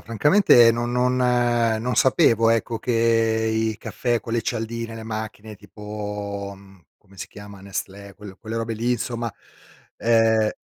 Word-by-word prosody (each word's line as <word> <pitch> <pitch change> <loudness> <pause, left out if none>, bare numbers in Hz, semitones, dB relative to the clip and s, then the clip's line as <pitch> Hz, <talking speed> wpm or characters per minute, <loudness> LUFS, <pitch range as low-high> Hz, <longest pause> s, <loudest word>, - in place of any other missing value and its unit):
Francamente, 120 - +5
no 120 +1 -2
non, 125 +1 0
ehm 120 -2 +2
non 125 +2 -2
sapevo, 115 -3 +4
ecco, 115 0 0
che 125 - -2 0.6
i 110 -1 -1
caffè 120 -2 -2
con 115 - -7
le 115 -1 0
cialdine, 115 0 -4
le 110 - -8
macchine, 110 -1 -6
tipo, 105 -1 -7
mhmm, 95 -2 -19
come 100 - -23
si - - -7
chiama, 105 -1 -12
Nestlé, 100 0 -7
quel 100 -2 -12
quelle 110 0 -6
robe 115 0 -3
lì, 115 +3 -2
insomma, 120 -1 -3 0.7
ehm 110 -2 +3
115 Hz, 150 wpm, -23 LUFS, 105-120 Hz, 0.7 s, Francamente